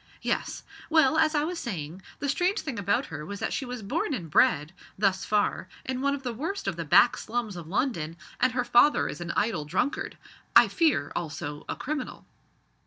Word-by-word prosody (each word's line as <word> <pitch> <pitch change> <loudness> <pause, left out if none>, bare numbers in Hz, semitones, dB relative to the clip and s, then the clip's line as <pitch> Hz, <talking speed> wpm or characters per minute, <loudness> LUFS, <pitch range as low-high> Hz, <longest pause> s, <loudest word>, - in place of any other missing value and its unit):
Yes. - - -2 0.3
Well, 315 -2 +4
as 315 0 +3
I 295 - +2
was 340 +2 -3
saying, 175 - -5 0.2
the 285 - -3
strange 360 +9 +1
thing 260 -8 -4
about 200 0 +1
her 150 - -5
was 200 +5 -6
that - - -2
she 270 - -2
was 245 -3 -6
born 290 +7 -1
and 170 - -7
bred 150 +3 +3 0.2
thus 195 -1 +1
far 205 -3 0 0.2
in 260 0 -2
one 280 +1 +2
of 275 - -9
the 245 -2 -3
worst 335 - -4
of - - 0
the - - -3
back - - +5
slums 230 -3 -3
of 170 -3 -8
London, 170 - -1 0.2
and 255 0 +3
her 250 -1 0
father 245 +5 +5
is - - -6
an 175 - -5
idle 205 -8 +1
drunkard. 310 - -2 0.4
I - - +8
fear, 305 - +2
also, 150 -2 -4
a - - -2
criminal." 295 +2 -5
240 Hz, 200 wpm, -27 LUFS, 175-290 Hz, 0.4 s, I